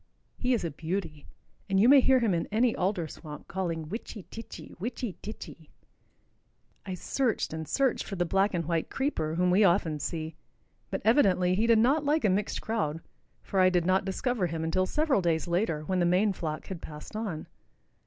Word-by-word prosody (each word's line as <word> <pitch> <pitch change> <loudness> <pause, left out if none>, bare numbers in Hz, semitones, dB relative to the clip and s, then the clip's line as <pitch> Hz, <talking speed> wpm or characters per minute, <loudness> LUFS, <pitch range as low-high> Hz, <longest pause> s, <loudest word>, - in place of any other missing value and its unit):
He 250 0 +1
is 230 - -3
a 170 - -2
beauty, 160 -1 -4 0.4
and 195 0 +3
you 220 - +6
may 280 +1 +8
hear 265 +1 +5
him 220 -5 +2
in 170 - -1
any 230 +2 +2
alder 180 -3 -1
swamp 150 -2 -10
calling 170 -4 -3
"witchy 210 +2 -6
titchy, 225 - -9
witchy 230 0 -4
titchy." 170 -7 -9 1.2
I 185 - -3
searched 235 - -1
and 160 -1 -5
searched 270 -3 +1
for 195 - -5
the 175 -1 0
black 195 +3 +1
and 170 -2 -1
white 165 0 -1
creeper 165 - -1
whom 180 +1 +2
we 195 +4 +5
often 170 -5 +2
see, 160 +2 -4 0.6
but - - -4
evidently 190 -7 +4
he 215 +5 +1
did 230 -1 +6
not 270 +7 +3
like 295 0 +1
a 200 - +4
mixed 205 +3 -1
crowd, 185 -9 -1 0.4
for 195 - -1
I 185 0 +6
did 175 -2 +1
not 185 +2 +3
discover 195 +1 -1
him 160 -1 -4
until 185 +3 +1
several 300 -5 +1
days 165 -1 0
later, 170 -3 0
when 185 +3 -1
the 175 - +3
main 195 +4 +3
flock 155 -4 -4
had 185 -4 -7
passed 150 +6 -9
on. 205 -8 -4
185 Hz, 195 wpm, -29 LUFS, 165-220 Hz, 1.2 s, may